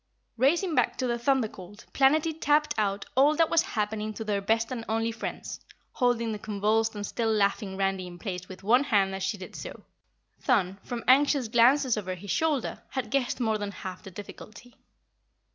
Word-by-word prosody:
Racing 325 Hz, -, +2 dB
back -, -, +1 dB
to 260 Hz, -, -1 dB
the 240 Hz, -1 st, -1 dB
Thunder 260 Hz, -1 st, +2 dB
Colt, 205 Hz, +2 st, -13 dB
Planetty 305 Hz, +4 st, +3 dB
tapped 300 Hz, -1 st, +2 dB
out 200 Hz, -2 st, -1 dB
all 285 Hz, +4 st, +5 dB
that 325 Hz, 0 st, +2 dB
was 330 Hz, -, +5 dB
happening 215 Hz, 0 st, -3 dB
to 225 Hz, -, -5 dB
their 205 Hz, -2 st, -1 dB
best 225 Hz, +3 st, 0 dB
and 240 Hz, -3 st, -4 dB
only 225 Hz, +1 st, 0 dB
friends, 230 Hz, -, -6 dB, 0.3 s
holding 240 Hz, -3 st, +1 dB
the 210 Hz, -, -4 dB
convulsed 215 Hz, +2 st, 0 dB
and 205 Hz, 0 st, -4 dB
still 225 Hz, +1 st, -1 dB
laughing 200 Hz, -2 st, 0 dB
Randy 195 Hz, -1 st, -1 dB
in 175 Hz, 0 st, -10 dB
place 180 Hz, -2 st, -6 dB
with 185 Hz, 0 st, -10 dB
one 245 Hz, +7 st, +4 dB
hand 195 Hz, -6 st, +2 dB
as 190 Hz, -, -5 dB
she 190 Hz, +2 st, -1 dB
did 185 Hz, -, -10 dB
so. -, -, -8 dB, 0.6 s
Thun, 195 Hz, -7 st, +1 dB
from 240 Hz, -1 st, -5 dB
anxious 270 Hz, -1 st, +4 dB
glances 245 Hz, +2 st, +4 dB
over 185 Hz, -3 st, -3 dB
his 190 Hz, +1 st, -7 dB
shoulder, 305 Hz, -6 st, 0 dB
had 245 Hz, -5 st, -4 dB
guessed 270 Hz, -2 st, 0 dB
more 220 Hz, -3 st, 0 dB
than 205 Hz, -1 st, -3 dB
half 185 Hz, -2 st, -7 dB
the -, -, -10 dB
difficulty. 210 Hz, +5 st, -11 dB
225 Hz, 190 wpm, -27 LUFS, 200-260 Hz, 0.6 s, all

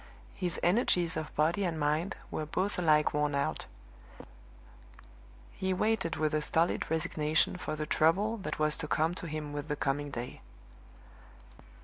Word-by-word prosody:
His 180 Hz, -3 st, -2 dB
energies 175 Hz, -3 st, +2 dB
of 155 Hz, -1 st, -4 dB
body 165 Hz, +6 st, +2 dB
and 170 Hz, -4 st, -1 dB
mind 155 Hz, +5 st, 0 dB, 0.2 s
were 155 Hz, -, -3 dB
both 190 Hz, +4 st, -1 dB
alike 155 Hz, -3 st, +3 dB
worn 150 Hz, -1 st, +1 dB
out; 110 Hz, -, -1 dB, 1.8 s
he 190 Hz, 0 st, -1 dB
waited 210 Hz, -4 st, +1 dB
with 155 Hz, 0 st, 0 dB
a 155 Hz, -, +2 dB
stolid 165 Hz, +3 st, +1 dB
resignation 155 Hz, 0 st, +1 dB
for 180 Hz, -3 st, -4 dB
the 155 Hz, 0 st, -3 dB
trouble 195 Hz, +10 st, +2 dB
that 195 Hz, -, -4 dB
was 155 Hz, 0 st, +3 dB
to 165 Hz, -, -3 dB
come 160 Hz, +3 st, +1 dB
to 175 Hz, -, -6 dB
him 150 Hz, -1 st, -5 dB
with 145 Hz, 0 st, -4 dB
the 150 Hz, -, -1 dB
coming 145 Hz, 0 st, -1 dB
day. 125 Hz, -2 st, -6 dB
155 Hz, 150 wpm, -31 LUFS, 150-180 Hz, 1.8 s, alike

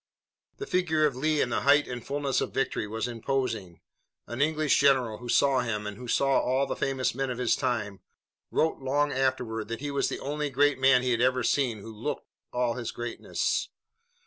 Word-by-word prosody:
The 415 Hz, -, -5 dB
figure 165 Hz, -, +1 dB
of 145 Hz, -4 st, 0 dB
Lee 155 Hz, +3 st, +1 dB
in -, -, +1 dB
the -, -, -1 dB
height 145 Hz, +1 st, +4 dB
and 120 Hz, -2 st, -6 dB
fullness 140 Hz, -2 st, -1 dB
of -, -, -4 dB
victory 135 Hz, -5 st, -1 dB
was 110 Hz, +3 st, -3 dB
imposing. 115 Hz, -, -3 dB, 0.4 s
An 120 Hz, +3 st, -5 dB
English 155 Hz, -1 st, +2 dB
general 130 Hz, -6 st, +3 dB
who 120 Hz, -1 st, -8 dB
saw 135 Hz, +1 st, +4 dB
him, 110 Hz, -4 st, -2 dB
and 105 Hz, 0 st, -5 dB
who 125 Hz, -, -9 dB
also 120 Hz, -, +1 dB
saw 135 Hz, -1 st, +3 dB
all 130 Hz, +2 st, +1 dB
the -, -, -3 dB
famous 135 Hz, -2 st, -1 dB
men 135 Hz, +1 st, -2 dB
of 125 Hz, -, -3 dB
his 125 Hz, -2 st, +2 dB
time, 105 Hz, -5 st, -2 dB, 0.5 s
wrote 160 Hz, -, +1 dB
long 145 Hz, +2 st, +1 dB
afterward 125 Hz, -5 st, -1 dB
that 115 Hz, 0 st, -4 dB
he 145 Hz, +1 st, -4 dB
was 140 Hz, -, 0 dB
the -, -, -4 dB
only 150 Hz, +1 st, -3 dB
great 140 Hz, 0 st, +2 dB
man 130 Hz, -1 st, +5 dB
he 130 Hz, -, +1 dB
had 115 Hz, -1 st, +1 dB
ever 130 Hz, 0 st, +2 dB
seen 120 Hz, -5 st, +1 dB
who 110 Hz, +2 st, -9 dB
looked 105 Hz, -, -4 dB, 0.3 s
all 125 Hz, -1 st, 0 dB
his 120 Hz, -1 st, -4 dB
greatness. 120 Hz, -1 st, -2 dB
130 Hz, 205 wpm, -28 LUFS, 115-140 Hz, 0.5 s, man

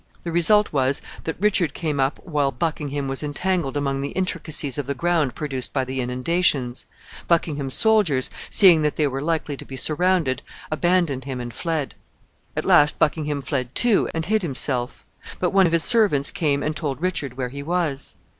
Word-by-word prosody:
The 170 Hz, -, -4 dB
result 190 Hz, +5 st, +4 dB
was, 135 Hz, -1 st, +1 dB, 0.3 s
that 160 Hz, -, -4 dB
Richard 190 Hz, -6 st, +1 dB
came 150 Hz, -4 st, -2 dB
up 135 Hz, +1 st, +1 dB
while 150 Hz, -5 st, 0 dB
Buckingham 145 Hz, 0 st, -3 dB
was 135 Hz, 0 st, -3 dB
entangled 150 Hz, -1 st, -2 dB
among 140 Hz, -1 st, -1 dB
the 140 Hz, -, -3 dB
intricacies 155 Hz, -7 st, -1 dB
of 140 Hz, -, -4 dB
the 140 Hz, -, -2 dB
ground 160 Hz, -4 st, 0 dB
produced 135 Hz, -4 st, -4 dB
by 135 Hz, -2 st, 0 dB
the 130 Hz, 0 st, -3 dB
inundations. 125 Hz, 0 st, -1 dB, 0.4 s
Buckingham's 150 Hz, -5 st, +1 dB
soldiers, 205 Hz, -, +4 dB, 0.2 s
seeing 180 Hz, -6 st, +6 dB
that 150 Hz, -1 st, 0 dB
they 155 Hz, -, +1 dB
were 135 Hz, -1 st, -2 dB
likely 155 Hz, -2 st, -2 dB
to -, -, -8 dB
be 135 Hz, -, -9 dB
surrounded, 155 Hz, -4 st, +1 dB, 0.3 s
abandoned 155 Hz, -5 st, 0 dB
him 130 Hz, -2 st, -5 dB
and 120 Hz, -1 st, -6 dB
fled. 160 Hz, -1 st, -3 dB, 0.6 s
At -, -, -2 dB
last 150 Hz, 0 st, +5 dB
Buckingham 150 Hz, -2 st, 0 dB
fled 125 Hz, -2 st, -3 dB
too, 235 Hz, -4 st, +2 dB
and 160 Hz, 0 st, -3 dB
hid 215 Hz, +4 st, +1 dB
himself; 130 Hz, -5 st, 0 dB, 0.3 s
but 180 Hz, -, 0 dB
one 195 Hz, -2 st, +4 dB
of -, -, -2 dB
his 165 Hz, -2 st, +2 dB
servants 200 Hz, -12 st, +3 dB
came 145 Hz, -3 st, 0 dB
and 155 Hz, 0 st, -2 dB
told 140 Hz, -5 st, -3 dB
Richard 150 Hz, -8 st, -3 dB
where 125 Hz, -2 st, -3 dB
he 140 Hz, +3 st, -7 dB
was. 155 Hz, -3 st, -2 dB
150 Hz, 180 wpm, -22 LUFS, 135-170 Hz, 0.6 s, seeing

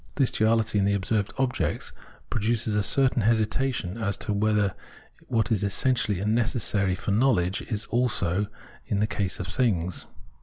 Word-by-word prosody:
This 135 Hz, -4 st, +2 dB
duaUty 110 Hz, -1 st, +2 dB
in 100 Hz, -, +2 dB
the 100 Hz, 0 st, +2 dB
observed 100 Hz, +1 st, -1 dB
object 130 Hz, -1 st, -1 dB, 0.4 s
produces 110 Hz, 0 st, 0 dB
a 105 Hz, -, +2 dB
certain 125 Hz, +4 st, +3 dB
hesitation 110 Hz, -1 st, 0 dB
as 100 Hz, -3 st, 0 dB
to 105 Hz, -, -2 dB
whether 105 Hz, -1 st, +1 dB, 0.5 s
what 115 Hz, -2 st, 0 dB
is 105 Hz, -3 st, +1 dB
essential 105 Hz, 0 st, +1 dB
and 105 Hz, +3 st, 0 dB
necessary 110 Hz, -5 st, +1 dB
for 100 Hz, +2 st, -3 dB
knowledge 100 Hz, -5 st, +2 dB
is 110 Hz, -2 st, -4 dB
also 105 Hz, -6 st, +1 dB
so -, -, -15 dB, 0.4 s
in 100 Hz, -, 0 dB
the 105 Hz, -, +3 dB
case 100 Hz, -4 st, -2 dB
of 95 Hz, -, -3 dB
things. 90 Hz, -5 st, -1 dB
105 Hz, 160 wpm, -26 LUFS, 100-120 Hz, 0.5 s, certain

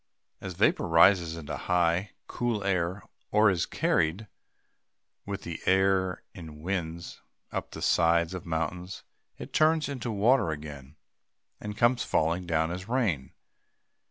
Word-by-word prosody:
As 95 Hz, -2 st, -6 dB
vapor 95 Hz, -1 st, +2 dB
rises 85 Hz, 0 st, +5 dB
into 75 Hz, -3 st, -5 dB
high, 90 Hz, +2 st, 0 dB
cool 120 Hz, -4 st, -2 dB
air, 95 Hz, 0 st, -1 dB, 0.3 s
or 105 Hz, -1 st, +4 dB
is 90 Hz, -3 st, -1 dB
carried 90 Hz, +8 st, 0 dB, 1.0 s
with 100 Hz, -1 st, -5 dB
the 85 Hz, -1 st, -6 dB
air 95 Hz, -1 st, +2 dB
in 80 Hz, -4 st, -11 dB
winds 85 Hz, -2 st, -4 dB, 0.3 s
up -, -, -4 dB
the -, -, -8 dB
sides 85 Hz, +1 st, +3 dB
of 90 Hz, -1 st, -6 dB
mountains, 85 Hz, +3 st, -4 dB, 0.3 s
it -, -, -9 dB
turns 155 Hz, 0 st, +3 dB
into 130 Hz, -4 st, -4 dB
water 110 Hz, -1 st, +3 dB
again, 75 Hz, -2 st, -7 dB, 0.6 s
and 105 Hz, 0 st, -7 dB
comes 120 Hz, 0 st, +3 dB
falling 85 Hz, 0 st, 0 dB
down 80 Hz, -1 st, +1 dB
as 90 Hz, +2 st, -6 dB
rain. 110 Hz, -, -1 dB
90 Hz, 130 wpm, -28 LUFS, 80-100 Hz, 1.0 s, rises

